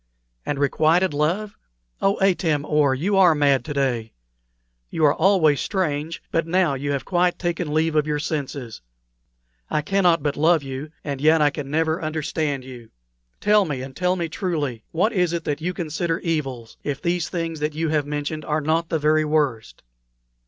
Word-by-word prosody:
And 145 - -1
requited 155 +5 +2
love! 175 +9 -1 0.5
Oh, 195 +1 +2
Atam 165 -6 +2
or, 150 -3 +2
you 190 +9 0
are 180 -4 +6
mad 140 -2 +3
to 150 - -4
day! 125 -5 -1 0.8
You 160 - +1
are 145 - +5
always 165 -5 +3
strange, 160 -5 -2
but 165 0 0
now 175 -3 +2
you 140 +2 -3
have 140 - -3
quite 180 -1 +1
taken 175 -3 -2
leave 160 +1 +1
of 150 0 +2
your 150 -1 0
senses. 140 -6 -4 0.9
I 150 - 0
cannot 175 -3 +2
but 145 -2 0
love 160 0 +3
you, 135 +3 -6
and 140 -2 -4
yet 155 +2 +5
I 150 -1 +4
can 145 -2 -6
never 160 +3 0
understand 155 -3 -2
you. 125 -3 -11 0.5
Tell 210 0 +4
me, 145 -7 -4
and 130 0 -9
tell 180 +1 +1
me 170 -2 -2
truly, 150 - -3
what 200 +8 +1
is 180 -4 +1
it 170 -1 -2
that 150 +1 -3
you 180 +3 -1
consider 165 -1 -2
evils, 135 -9 -3
if 140 -2 -3
these 170 +1 -1
things 165 -3 -3
that 150 0 -2
you 160 0 -1
have 150 -2 0
mentioned 150 +1 -3
are 150 +1 0
not 165 +2 0
the 160 - +1
very 155 +1 +2
worst?" 140 - -1
155 Hz, 180 wpm, -23 LUFS, 145-170 Hz, 0.9 s, are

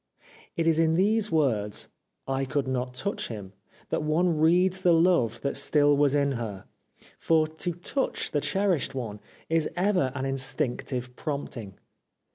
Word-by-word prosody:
It 165 - +1
is 165 -1 +3
in 160 0 +3
those 210 +4 +2
words 115 -10 0 0.2
'' - - -53
I 135 0 -1
could 135 0 -1
not 125 -1 -2
touch 200 +11 -3
him 100 -4 -8 0.2
" - - -29
that - - 0
one 160 +3 +1
reads 180 +4 +3
the 175 -2 +4
love 165 - +3
that 140 - -2
still 145 -1 +3
was 145 0 +3
in 140 -1 +2
her; 110 -7 -5 0.5
for 160 -1 +3
to 160 +3 -4
touch 180 - -2
the 145 - 0
cherished 190 -8 0
one 110 -5 -5 0.3
is 160 -1 +1
ever 180 -7 +1
an 130 -1 -2
instinctive 130 -2 -2
prompting. 130 - -5
145 Hz, 160 wpm, -27 LUFS, 125-170 Hz, 0.5 s, the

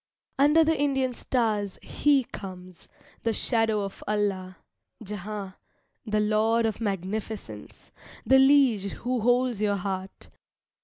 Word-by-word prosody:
Under 300 +3 +5
the 320 +1 +2
Indian 270 -3 0
stars 215 -6 -1
He 285 -3 +2
comes, 185 -5 -10 0.3
"the 230 - 0
Shadow 225 -2 +1
of 195 -1 -6
Allah," 195 -3 -1 0.5
Jehan, 205 -1 -6 0.5
the 215 0 +1
lord 220 +2 +2
of 220 0 -2
Magnificence, 195 - -5 0.3
The 265 0 +6
liege 265 -8 +4
who 250 0 -2
holds 245 -1 +2
your 205 -1 +2
heart. 190 0 -5
215 Hz, 115 wpm, -26 LUFS, 195-250 Hz, 0.5 s, The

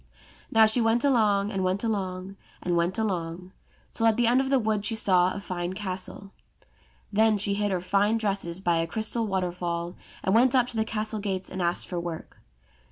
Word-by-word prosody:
Now 225 0 +6
she 220 +3 +3
went 225 +2 +2
along, 210 -7 +2
and 195 -2 -2
went 185 +3 0
along, 195 -3 -3 0.3
and 175 -1 0
went 170 +2 +1
along, 180 -4 -3 0.4
till 225 - +2
at 220 - +3
the 240 - +3
end 245 +3 +4
of 265 - -3
the 270 - +4
wood 215 -4 0
she 225 +2 0
saw 185 -4 +4
a 200 - -5
fine 180 -2 -4
castle. 190 0 -4 0.8
Then 220 +1 +4
she 200 0 +1
hid 205 +1 0
her 185 -2 -1
fine 200 +4 +2
dresses 195 -5 -2
by 175 -3 +1
a 165 0 0
crystal 220 +4 -2
waterfall 175 -2 -3 0.3
and 190 - +1
went 245 +3 +4
up 250 -2 +4
to - - -7
the 220 0 0
castle 215 0 -2
gates 190 -2 -3
and 185 - -4
asked 175 0 0
for 175 - -3
work. 170 -2 -7
200 Hz, 200 wpm, -26 LUFS, 180-220 Hz, 0.8 s, Now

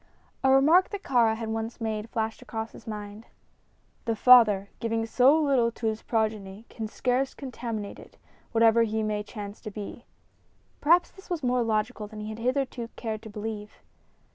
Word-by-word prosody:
A 265 - +4
remark 300 +8 +5
that 405 -2 -6
Kāra 235 -4 +3
had 225 0 -5
once 225 +2 -4
made 220 -1 -3
flashed 225 -2 -3
across 225 0 -5
his - - -14
mind: 210 0 -7 0.8
"The 230 - 0
father, 215 -5 +6
giving 225 0 -1
so 260 +7 +4
little 265 -6 +2
to 235 - -7
his 220 0 -1
progeny, 215 -2 -2
can 220 -2 -5
scarce 255 +4 -1
contaminate 235 -6 -5
it, - - -15 0.3
whatever 230 0 +5
he 220 -1 0
may 210 -1 -1
chance 205 -1 -8
to 215 - -6
be." 210 +3 -8 0.7
Perhaps 340 +4 +4
this 385 - -16
was 340 -5 -3
more 250 0 +2
logical 220 -1 -1
than 215 0 -9
he 210 - -5
had 220 +1 -7
hitherto 255 -1 -1
cared 220 -2 -4
to 220 - -10
believe. 210 0 -6
225 Hz, 170 wpm, -27 LUFS, 215-250 Hz, 0.8 s, father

